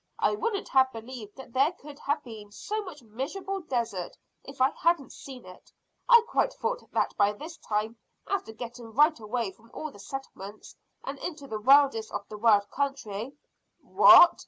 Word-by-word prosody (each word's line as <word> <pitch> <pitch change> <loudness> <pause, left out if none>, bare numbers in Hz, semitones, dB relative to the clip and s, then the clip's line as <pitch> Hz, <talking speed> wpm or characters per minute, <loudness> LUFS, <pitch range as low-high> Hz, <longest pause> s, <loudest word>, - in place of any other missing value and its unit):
I - - +2
wouldn't 415 -1 -2
have 260 -1 +4
believed 225 -2 -9
that 260 -3 -12
there 275 +6 +3
could 290 -3 -13
have 290 +1 -1
been 215 -5 -10
so 425 - -4
much 340 -9 -10
miserable 305 - -4
desert 230 - -3 0.3
if 275 -1 -11
I 260 +1 +4
hadn't 335 -5 0
seen 260 -5 -10
it. 185 0 -14 0.4
I 475 -2 +9
quite - - +1
thought - - -3
that - - 0
by 205 0 +3
this 320 +10 -9
time, 215 +2 -2 0.3
after 395 - -2
getting 235 0 -9
right 300 +4 +4
away 220 -1 -2
from 230 +4 -22
all 310 -3 -5
settlements 205 -2 -8 0.3
and 275 0 -6
into 310 -5 -6
the 220 -5 -5
wildest 270 -3 +5
of 205 0 -5
the 210 - -7
wild 205 -2 +4
country 270 -4 -3 0.3
" - - -50
"What!" 350 - +8
260 Hz, 175 wpm, -28 LUFS, 220-300 Hz, 0.4 s, I